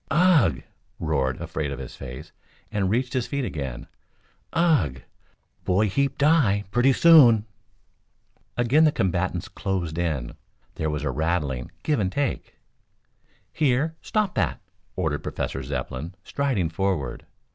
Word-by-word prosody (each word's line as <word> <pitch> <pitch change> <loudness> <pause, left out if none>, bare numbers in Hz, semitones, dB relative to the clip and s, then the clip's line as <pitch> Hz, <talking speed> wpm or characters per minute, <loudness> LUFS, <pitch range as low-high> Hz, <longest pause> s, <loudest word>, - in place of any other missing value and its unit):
"Ugh!" 170 -3 +4 0.4
roared 65 -1 0
Afraid 75 -2 -3
Of 70 - -4
His - - -8
Face, 65 -1 -9 0.4
and 100 -3 0
reached 125 +4 0
his 125 -2 -1
feet 140 -2 -2
again. 70 - -5 0.7
"Ugh! 150 - +2 0.6
Boy 100 +3 +2
heap 140 +6 0
die! 140 -10 +3
Plenty 120 +4 +4
soon!" 130 -8 +7 1.1
Again 125 +6 +4
the 155 - +5
combatants 95 -3 -1
closed 90 -5 -3
in. 75 -8 -2 0.4
There 80 - -2
was 75 0 -3
a 75 - 0
rattling 75 -6 -1
give 150 -5 +1
and 95 -3 0
take. 140 +3 -2 1.0
"Here! 150 +2 +1
Stop 210 -4 0
that!" 90 -7 0 0.4
ordered 80 -5 -1
Professor 65 - -4
Zepplin, 70 +5 -5
striding 125 - -1
forward. 85 -6 -2
95 Hz, 125 wpm, -25 LUFS, -, 1.1 s, soon